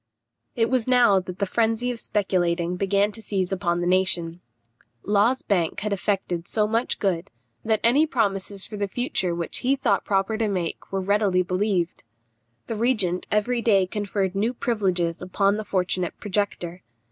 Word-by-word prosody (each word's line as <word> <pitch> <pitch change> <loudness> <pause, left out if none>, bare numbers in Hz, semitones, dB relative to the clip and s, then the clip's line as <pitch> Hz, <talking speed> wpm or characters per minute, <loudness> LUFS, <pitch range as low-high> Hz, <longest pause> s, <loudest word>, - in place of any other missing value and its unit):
It 225 -1 +2
was 255 -3 +1
now 245 -6 +5
that 180 -1 -7
the 200 - 0
frenzy 225 +4 0
of 240 - -5
speculating 180 -4 0
began 200 +2 +1
to 225 - -9
seize 195 -4 -2
upon 175 -2 0
the - - -1
nation. 180 -2 +2 0.6
Law's 210 +6 +2
bank 175 -5 0
had 210 0 -1
effected 185 -3 -2
so 215 -1 +1
much 225 +3 0
good, 185 -4 -1 0.3
that 220 -1 +1
any 275 +7 +4
promises 200 -6 -1
for 210 - -8
the 200 0 -1
future 190 -5 -1
which 170 -1 -3
he 260 +2 +2
thought 205 -7 +1
proper 200 +2 0
to 225 - +1
make 180 -5 -3
were 195 0 -1
readily 195 -1 +2
believed. 185 -1 -1 0.6
The 225 - -4
regent 210 -6 0
every 235 +3 +1
day 200 -5 +4
conferred 195 -1 -2
new 220 +6 0
privileges 185 -9 -1
upon 195 +3 +1
the 215 - -3
fortunate 185 -3 -1
projector. 185 -3 -3
200 Hz, 165 wpm, -24 LUFS, 180-220 Hz, 0.6 s, now